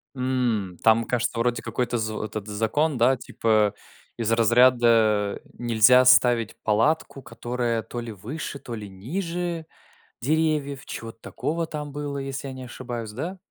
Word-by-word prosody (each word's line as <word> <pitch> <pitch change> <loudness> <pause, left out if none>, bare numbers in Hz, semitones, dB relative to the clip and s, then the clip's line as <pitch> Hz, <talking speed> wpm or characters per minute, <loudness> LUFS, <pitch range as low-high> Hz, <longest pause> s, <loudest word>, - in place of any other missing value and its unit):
М. 120 -8 -1
Там, 115 +1 +5
кажется, 120 -1 -1
вроде 120 -1 0
какой-то 125 -1 -2
з 110 -1 -2
этот 105 -1 -5
закон, 115 +8 0
да, 125 +3 +4
типа 110 -3 +1 0.4
из 115 -1 -1
разряда 115 -3 +4 0.2
нельзя 120 +2 +5
ставить 120 -2 +5
палатку, 135 +6 +1
которая 120 -2 -2
то 120 - -7
ли 115 - -6
выше, 135 - -6
то 120 -3 -7
ли 105 -2 -8
ниже 170 - -4 0.6
деревьев, 150 -1 0
чего-то 115 0 -8
такого 160 +8 -3
там 150 -2 -6
было, 145 0 -4
если 135 0 -5
я 135 - -6
не 130 0 -8
ошибаюсь, 120 -3 -6
да? 165 - -5
120 Hz, 140 wpm, -25 LUFS, 110-140 Hz, 0.6 s, Там